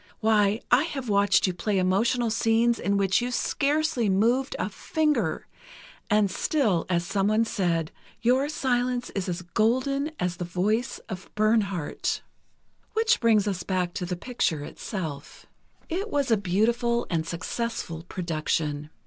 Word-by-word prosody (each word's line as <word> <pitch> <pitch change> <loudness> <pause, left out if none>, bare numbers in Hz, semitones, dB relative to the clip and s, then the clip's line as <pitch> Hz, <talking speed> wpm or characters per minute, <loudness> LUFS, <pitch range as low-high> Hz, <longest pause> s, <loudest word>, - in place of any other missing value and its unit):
Why, 215 -1 +3
I 260 +5 +5
have 270 -7 -5
watched 200 -1 +4
you 185 - 0
play 195 +3 -1
emotional 225 +6 +2
scenes 225 +1 +2
in 200 0 +1
which 195 +2 +2
you 245 - -1
scarcely 280 -1 0
moved 235 +8 +2
a - - -1
finger, 310 -2 -1 0.6
and 210 -2 +3
still, 215 - +1
as 175 -1 +1
someone 210 +4 +2
said: 170 -7 -1 0.3
"Your 255 +4 +2
silence 250 -3 -1
is 195 -2 -3
as 180 +1 -3
golden 255 - +1
as 180 -1 -1
the 175 - -3
voice 200 +7 -1
of 190 -3 -7
Bernhardt." 210 -7 0 0.7
Which 450 +1 +3
brings 220 -3 +3
us 190 -3 -1
back 180 -1 -1
to 180 -3 -4
the 180 - -2
picture 170 - -1
itself. 155 -4 -6 0.4
It 385 +6 -3
was 285 - 0
a - - +7
beautiful 230 +5 +1
and 165 -1 0
successful 170 -1 -4
production. 155 -3 -2
210 Hz, 140 wpm, -26 LUFS, 180-245 Hz, 0.7 s, a